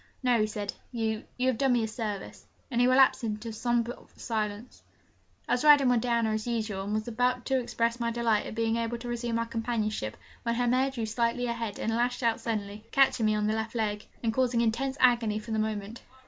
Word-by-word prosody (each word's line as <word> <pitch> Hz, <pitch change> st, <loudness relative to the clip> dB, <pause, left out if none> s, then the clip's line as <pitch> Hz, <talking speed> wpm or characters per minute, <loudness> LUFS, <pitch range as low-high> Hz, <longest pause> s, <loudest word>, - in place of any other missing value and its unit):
'No,' 245 Hz, -2 st, +3 dB
he 215 Hz, -, +2 dB
said, 205 Hz, -1 st, -4 dB, 0.2 s
'you 225 Hz, -2 st, -2 dB
you 255 Hz, -, 0 dB
have 260 Hz, -3 st, +1 dB
done 270 Hz, -2 st, +3 dB
me 240 Hz, -2 st, +2 dB
a -, -, -1 dB
service,' 215 Hz, -3 st, -5 dB, 0.2 s
and 240 Hz, 0 st, +2 dB
he 245 Hz, -, +5 dB
relapsed 260 Hz, -1 st, +5 dB
into 215 Hz, +1 st, -3 dB
a -, -, -6 dB
sombre 240 Hz, +1 st, 0 dB, 0.2 s
silence. 215 Hz, 0 st, -4 dB, 0.7 s
I -, -, -3 dB
was 245 Hz, -, +2 dB
riding 290 Hz, -3 st, +7 dB
with 245 Hz, -2 st, +3 dB
Diana 235 Hz, -2 st, +1 dB
as 215 Hz, +1 st, -2 dB
usual, 215 Hz, -5 st, -2 dB
and 205 Hz, -, -3 dB
was 215 Hz, +1 st, -2 dB
about 245 Hz, +1 st, 0 dB
to 265 Hz, -1 st, +2 dB
express 235 Hz, -1 st, -1 dB
my 235 Hz, 0 st, 0 dB
delight 230 Hz, -2 st, +1 dB
at -, -, -7 dB
being 225 Hz, 0 st, +1 dB
able 230 Hz, +1 st, -2 dB
to 240 Hz, +1 st, -8 dB
resume 240 Hz, -1 st, -2 dB
our 230 Hz, -, 0 dB
companionship, 225 Hz, -, -2 dB, 0.2 s
when 235 Hz, 0 st, -1 dB
her 245 Hz, +1 st, +1 dB
mare 255 Hz, +3 st, +2 dB
drew 240 Hz, -4 st, -3 dB
slightly 235 Hz, +2 st, 0 dB
ahead 235 Hz, -3 st, -3 dB
and 225 Hz, -, -1 dB
lashed 245 Hz, +2 st, 0 dB
out 230 Hz, -1 st, +2 dB
suddenly, 210 Hz, -2 st, -4 dB
catching 265 Hz, -5 st, +4 dB
me 215 Hz, -, +2 dB
on 210 Hz, 0 st, 0 dB
the 215 Hz, -, +1 dB
left 220 Hz, +1 st, -3 dB
leg, 210 Hz, -2 st, -2 dB, 0.2 s
and 225 Hz, -1 st, +1 dB
causing 245 Hz, -1 st, +2 dB
intense 260 Hz, +4 st, 0 dB
agony 235 Hz, -4 st, +3 dB
for 215 Hz, +1 st, -7 dB
the 220 Hz, -, 0 dB
moment. 215 Hz, +1 st, -3 dB
230 Hz, 225 wpm, -29 LUFS, 215-245 Hz, 0.7 s, riding